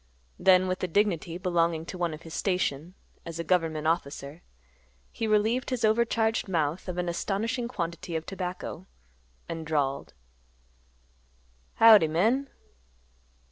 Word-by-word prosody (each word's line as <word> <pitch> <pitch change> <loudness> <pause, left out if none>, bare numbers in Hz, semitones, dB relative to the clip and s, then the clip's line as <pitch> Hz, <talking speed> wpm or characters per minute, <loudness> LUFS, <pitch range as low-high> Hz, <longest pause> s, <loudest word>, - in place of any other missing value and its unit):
Then 185 -1 +5
with 185 0 -2
the 185 - -1
dignity 175 -3 0
belonging 170 -3 0
to 185 - -7
one 175 -2 0
of 155 +1 -9
his 165 - -10
station, 180 -3 -1 0.3
as 165 -1 -7
a 170 - -3
government 165 -3 0
officer, 150 -1 -2 0.7
he 225 - -3
relieved 220 +4 +1
his 250 -3 0
overcharged 225 0 +1
mouth 165 +1 -1
of 180 - -4
an 180 0 -1
astonishing 220 +7 -2
quantity 170 -6 -4
of 160 0 -3
tobacco, 185 -1 -6 0.6
and 165 -1 -5
drawled, 145 -3 -2 1.6
"Howdy, 220 -7 +8
men." 225 - +1
180 Hz, 130 wpm, -28 LUFS, 165-210 Hz, 1.6 s, Howdy